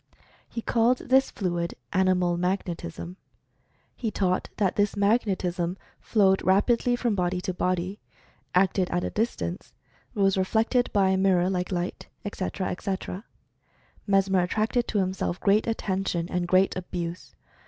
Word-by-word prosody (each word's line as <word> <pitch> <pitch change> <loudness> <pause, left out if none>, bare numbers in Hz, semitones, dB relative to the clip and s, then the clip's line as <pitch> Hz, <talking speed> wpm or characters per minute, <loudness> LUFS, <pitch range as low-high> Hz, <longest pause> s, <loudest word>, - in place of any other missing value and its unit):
He 230 - -5
called 235 +2 +3
this 265 +2 +3
fluid 175 -3 -2 0.2
"animal 180 -2 +2
mag 180 +3 0
netism." 170 +1 -6 0.8
He 230 - -2
taught 185 -3 0
that 200 -3 +1
this 205 0 +1
"magnetism" 190 -4 +1 0.2
flowed 195 -3 +3
rapidly 235 +6 +3
from 240 -2 0
body 180 -1 0
to 185 0 -3
body; 185 +2 -1 0.6
acted 185 0 +3
at 175 0 -1
a - - -2
distance; 90 - -3 0.4
was 195 -2 +2
reflected 225 +6 +1
by 195 -3 +3
a 190 - +2
mirror, 190 -1 +3
like 180 0 -2
light, 175 0 -3 0.2
etc., 190 -1 -3
etc. 190 +2 -4 0.8
Mesmer 195 -1 +3
at 180 0 0
tracted 225 +3 0
to 215 - -1
himself 185 -2 -1
great 210 +2 +3
attention 190 -6 -1
and 175 -1 -1
great 185 +2 +3
abuse. 175 -1 -5
190 Hz, 140 wpm, -26 LUFS, 180-205 Hz, 0.8 s, called